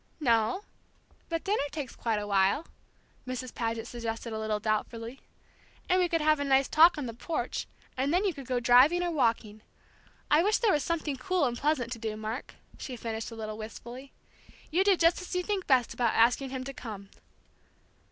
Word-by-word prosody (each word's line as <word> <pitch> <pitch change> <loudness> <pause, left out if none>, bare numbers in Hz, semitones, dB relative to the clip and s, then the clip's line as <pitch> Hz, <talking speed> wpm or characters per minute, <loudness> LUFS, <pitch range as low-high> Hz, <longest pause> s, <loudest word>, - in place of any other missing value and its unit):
"No, 235 - +2 0.7
but 330 -1 -2
dinner 410 +2 +1
takes 285 -5 -6
quite 225 -2 -1
a 205 - -3
while," 200 +9 +2 0.6
Mrs. 255 -1 -5
Paget 230 -1 -2
suggested 230 -1 -5
a 220 - -3
little 215 -1 -1
doubtfully; 225 +3 -3 0.7
"and 365 +1 +3
we 355 -1 +2
could 330 -1 +1
have 305 0 +3
a - - 0
nice 270 -1 +3
talk 325 +2 +6
on 290 - -3
the 230 - -5
porch, 310 +8 -3 0.3
and 270 +3 0
then 365 +5 +2
you 385 - +1
could 275 -4 -10
go 250 -1 0
driving 255 +9 +5
or 350 - -1
walking. 225 -7 0 0.7
I 300 +2 +6
wish 415 +4 +3
there 450 -4 +2
was 295 - +1
something 315 -4 -2
cool 365 +2 0
and 240 -2 -1
pleasant 270 -3 0
to 240 - -5
do, 220 -1 -4
Mark," 220 +4 -5 0.2
she 255 - -6
finished 225 -1 -5
a 230 - -9
little 215 -1 -6
wistfully. 240 +4 -9 0.6
"You 360 +4 +3
do 395 -2 +4
just 335 +2 +3
as 360 - -6
you 360 - 0
think 395 -1 -2
best 255 -4 +3
about 235 -3 +1
asking 245 +4 +3
him 260 0 -4
to 275 +1 -6
come." 205 -6 -8
255 Hz, 195 wpm, -29 LUFS, 225-315 Hz, 0.7 s, talk